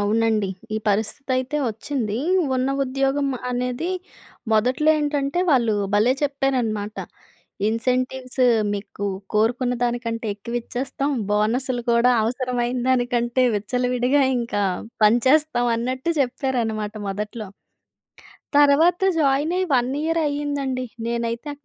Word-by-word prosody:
అవునండి. 215 0 +1 0.3
ఈ - - 0
పరిస్థితి 215 +6 -1
అయితే 260 +3 -3
వచ్చింది. 225 -1 -3 0.4
ఉన్న 255 +1 0 0.2
ఉద్యోగం 270 +2 0 0.2
అనేది 250 +7 -2 0.6
మొదట్లో 250 +8 +3
ఏంటంటే 290 +1 -1
వాళ్ళు 235 -6 +3 0.2
భలే! 215 +5 +4
చెప్పారన్నమాట. 250 -7 -1 0.7
ఇన్సెంటివ్స్ 255 +3 -1 0.3
మీకు 205 0 -5 0.3
కోరుకున్న 245 +4 +1
దానికంటే 235 -1 -2
ఎక్కువ 235 +4 -4
ఇచ్చేస్తాం. 270 +4 -3 0.2
బోనస్‌లు 240 +4 0
కూడా 235 +2 +4
అవసరమైన 245 +1 -1
దానికంటే 245 0 +1
విచ్చలవిడిగా 250 +5 +1 0.2
ఇంకా 230 -4 -2 0.4
పంచేస్తాం 245 +3 +3
అన్నట్టు 255 +6 -2
చెప్పారన్నమాట 235 -5 -1
మొదట్లో. 210 +2 -4 1.1
తర్వాత 300 +5 +5 0.2
జాయిన్ 290 +3 +2
అయ్యి 370 -1 0
1 245 0 +2
ఇయరే 330 +1 +1
అయిందండి. 285 -3 -2 0.2
నేనైతే 235 +4 -2
250 Hz, 100 wpm, -22 LUFS, 230-270 Hz, 1.1 s, తర్వాత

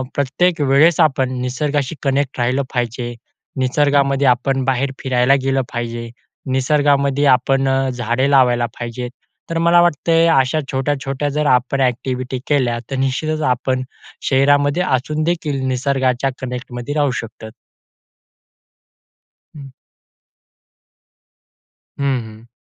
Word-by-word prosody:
प्रत्येक 160 +4 +1
वेळेस 145 +4 +4
आपण 130 -4 +2
निसर्गाशी 140 +3 -2
कनेक्ट 135 -1 -1
राहिलं 130 +3 +1
पाहिजे. 120 0 -3 0.5
निसर्गामध्ये 140 +1 +2
आपण 130 +2 +1
बाहेर 135 +1 0
फिरायला 130 +1 +3
गेलं 135 0 +1
पाहिजे. 115 0 -4 0.4
निसर्गामध्ये 140 +1 +2
आपण 135 +1 +3 0.2
झाडे 120 +2 -1
लावायला 125 -3 +4
पाहिजे. 120 +1 -5 0.4
तर 165 - -2
मला 170 +1 +5
वाटते 165 0 +2
अशा 135 -1 +2
छोट्या 135 +2 0
छोट्या 140 +2 -2
जर 150 +1 -1
आपण 135 +2 -1
एक्टिव्हिटी 130 0 -2
केल्या 125 -5 +1
तर - - -1
निश्चितच 155 +4 -1
आपण 130 +1 -2 0.5
शहरामध्ये 145 +4 +3
असूनदेखील 155 +1 -2
निसर्गाच्या 130 0 0
कनेक्टमध्ये 125 +1 -5
राहू 145 -3 +2
शकतो. 110 -1 -10 2.1
हं. 140 -2 -10 2.3
हं, 135 -3 0
हं. 110 +1 -14
135 Hz, 105 wpm, -18 LUFS, 125-145 Hz, 2.3 s, मला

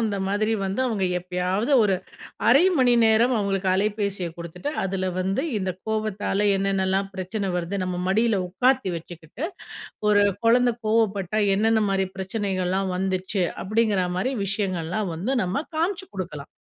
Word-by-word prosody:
அந்த 215 -3 0
மாதிரி 215 +2 +1
வந்து 195 +6 -2
அவங்க 210 -5 -1
எப்பயாவது 180 +7 -1
ஒரு 200 -3 +3 0.5
1/2 275 +7 +7 0.2
மணி 250 -1 +4
நேரம் 225 +3 +4
அவங்களுக்கு 195 -2 0
அலைபேசியை 200 -2 -1
குடுத்துட்டு, 170 - -5
அதில 185 -1 -1
வந்து 190 +2 0 0.2
இந்த 190 -1 -2 0.2
கோபத்தால 210 -1 0
என்னென்னலாம் 195 0 0
பிரச்சனை 195 +2 -3
வருது 180 +3 -2
நம்ம 180 -1 -3
மடியில 220 +1 +2
உட்காத்தி 250 +2 +2
வச்சுக்கிட்டு, 165 - -8 0.6
ஒரு 205 -1 +5 0.2
கொழந்தை 245 +1 +4
கோவப்பட்டா 215 -2 +1
என்னென்ன 220 +2 +3
மாரி 195 -1 +1
பிரச்சனைகள்லாம் 190 -1 -1
வந்துச்சு. 190 +1 -1 0.2
அப்படிங்கிற 210 -2 +1
மாரி 255 +8 0
விஷயங்கள்லாம் 190 -1 -2
வந்து 205 +12 -1
நம்ம 190 - -2
காமிச்சு 365 +3 -1
குடுக்கலாம். 165 -7 -6
195 Hz, 135 wpm, -24 LUFS, 185-220 Hz, 0.6 s, 1/2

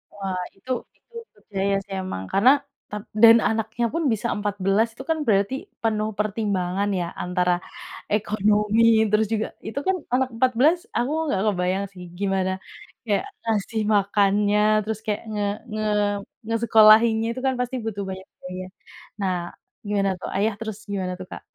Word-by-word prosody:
Wah, 190 -2 -3
itu 255 +7 -8 0.3
itu 475 - -26 0.2
percaya 200 -1 -2
sih 195 0 -10
emang, 95 - -5
karena 215 +7 +6 0.4
tap 210 0 -5 0.2
dan 230 0 +10
anaknya 225 +2 0
pun 330 0 0
bisa 220 +2 -2
14 205 +1 +1
itu 265 - -9
kan 320 - +2
berarti 200 +2 +2 0.3
penuh 215 -1 0
pertimbangan 200 -2 -1
ya 175 - -1 0.2
antara 180 0 +1 0.6
ekonomi 210 +1 +2 0.3
terus 215 +1 +3
juga 220 0 0 0.2
itu 250 +6 -3
kan 380 - +3 0.2
anak 260 0 +2
14 255 +7 +3 0.2
aku 245 +4 0 0.2
nggak 195 -10 0
kebayang 185 -1 0
sih, 180 - -10 0.2
gimana 190 -2 0 0.6
kayak 205 - +1 0.2
ngasih 220 0 0
makannya 205 +1 +3 0.2
terus 220 0 -3
kayak 210 0 -1
nge 210 -1 -1 0.3
nge 215 0 -2 0.7
ngesekolahinnya, 225 0 +6
itu 255 - -5
kan 260 - +1
pasti 250 +1 -2
butuh 205 -2 -3
banyak 190 0 -7
biaya. 185 0 -6 0.5
Nah 190 -2 0 0.5
gimana 200 -1 +1
tuh - - -5
Ayah, 210 +3 +1
terus 220 -2 -5
gimana 185 -2 -2
tuh 185 - -8
Kak? - - -7
210 Hz, 150 wpm, -24 LUFS, 195-225 Hz, 0.7 s, dan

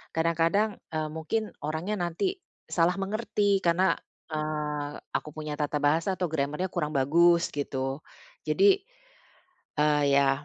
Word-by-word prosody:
kadang-kadang, 165 +6 +2 0.2
eee, 155 -1 -2
mungkin 210 +7 -2
orangnya 160 +7 -2
nanti 355 - -1 0.2
salah 175 +2 +2
mengerti 200 0 0
karena, 175 +2 +3 0.4
eee, 150 -1 -2 0.2
aku 150 - -2
punya 155 -1 -4
tata 150 0 0
bahasa 160 +6 +1
atau 180 - 0
grammar-nya 150 +5 -1
kurang 160 -4 -1
bagus, 170 +5 +4
gitu, 135 -1 -3 0.5
jadi, 395 0 +5 1.0
eee, 150 0 +3
ya, 140 0 +3
160 Hz, 120 wpm, -28 LUFS, 150-190 Hz, 1.0 s, jadi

